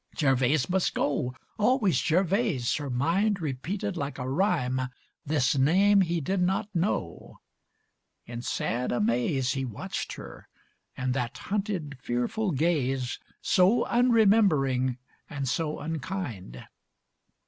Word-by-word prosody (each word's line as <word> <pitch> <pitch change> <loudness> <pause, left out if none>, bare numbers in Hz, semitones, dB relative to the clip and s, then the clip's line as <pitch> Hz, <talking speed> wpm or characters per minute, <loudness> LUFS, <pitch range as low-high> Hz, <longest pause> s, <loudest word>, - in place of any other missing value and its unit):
Gervase 135 -1 +2
must 185 0 0
go, 125 -3 -1 0.2
always 210 - +3
Gervase, 180 - +1
her 145 -2 -5
mind 175 - +1
Repeated 165 +7 -3
like 145 -3 -4
a 125 -1 -4
rhyme 135 -5 +1 0.5
This 145 -3 +2
name 190 +9 +4
he 170 -2 0
did 185 +6 -1
not 195 +3 0
know. 170 - -2 0.9
In 120 0 -6
sad 125 0 -2
amaze 125 +3 +1
He 135 -1 -2
watched 120 -6 -5
her, - - -10 0.5
and 130 -1 -1
that 125 -3 -3
hunted, 195 - -3
fearful 125 - -1
gaze, 135 -5 0 0.2
So 195 +6 +4
unremembering 195 - +3 0.3
and 140 -3 -4
so 155 +4 -1
unkind. 150 - -5
150 Hz, 115 wpm, -27 LUFS, 130-190 Hz, 0.9 s, name